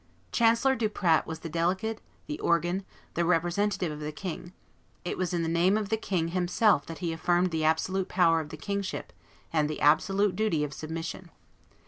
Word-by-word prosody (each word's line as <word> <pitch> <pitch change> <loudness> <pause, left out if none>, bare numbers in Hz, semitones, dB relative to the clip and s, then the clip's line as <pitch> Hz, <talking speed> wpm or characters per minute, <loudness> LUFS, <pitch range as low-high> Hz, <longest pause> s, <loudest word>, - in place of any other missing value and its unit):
Chancellor 235 +3 +3
Duprat 205 -8 +1
was 160 0 -6
the - - -5
delegate, 185 +7 -1 0.2
the 300 0 -5
organ, 175 +3 +1 0.3
the 170 - +1
representative 175 +2 +1
of 150 - -6
the 150 0 -4
king; 175 +1 -6 0.5
it - - -2
was 185 -2 -2
in 170 -2 0
the - - -1
name 175 +5 +3
of 210 -2 -3
the 220 - +2
king 180 -6 -1
himself 180 0 +2
that 165 - -6
he 165 - -1
affirmed 175 +2 +1
the 160 -1 -1
absolute 185 +4 +1
power 165 -3 +4
of 155 -2 -5
the 155 - -8
kingship 200 +3 -4 0.4
and 150 -2 +2
the 155 - -4
absolute 195 +6 +3
duty 205 -7 +1
of 145 -1 -4
submission. 165 +4 -6
175 Hz, 180 wpm, -28 LUFS, 160-195 Hz, 0.5 s, power